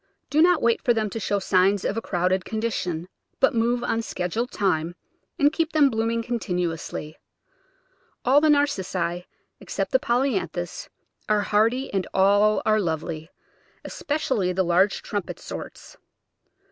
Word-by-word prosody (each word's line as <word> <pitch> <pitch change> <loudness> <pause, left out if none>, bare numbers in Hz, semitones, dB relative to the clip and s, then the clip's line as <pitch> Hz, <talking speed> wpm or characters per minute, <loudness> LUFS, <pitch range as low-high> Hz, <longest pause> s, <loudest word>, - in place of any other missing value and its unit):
Do 305 - +4
not 355 +2 +4
wait 235 -1 +2
for 240 -3 +2
them 215 -2 -1
to 225 - -4
show 205 -1 0
signs 190 0 +2
of 200 - 0
a 225 - -2
crowded 185 -1 0
condition, 190 -7 -3 0.3
but 270 - +4
move 240 +1 +1
on 225 - 0
schedule 220 +3 -3
time, 175 -6 -1 0.4
and 290 -1 +3
keep 325 -1 -1
them 290 -3 +4
blooming 230 +1 -1
con 240 0 -2
tinuously. 165 -5 -4 1.1
All 270 +4 +5
the 310 - +3
Narcissi, 185 - 0 0.3
except - - -4
the - - +4
Polyanthus, 235 - -1 0.4
are 210 -1 +3
hardy, 225 +6 +1
and 195 -2 -1
all 205 +2 +4
are 215 0 +3
lovely 160 -2 -3 0.3
— - - -34
especially 260 -11 -1
the 190 +1 +1
large 185 +4 +2
trumpet 205 -5 -4
sorts. - - -9
210 Hz, 145 wpm, -24 LUFS, 180-240 Hz, 1.1 s, All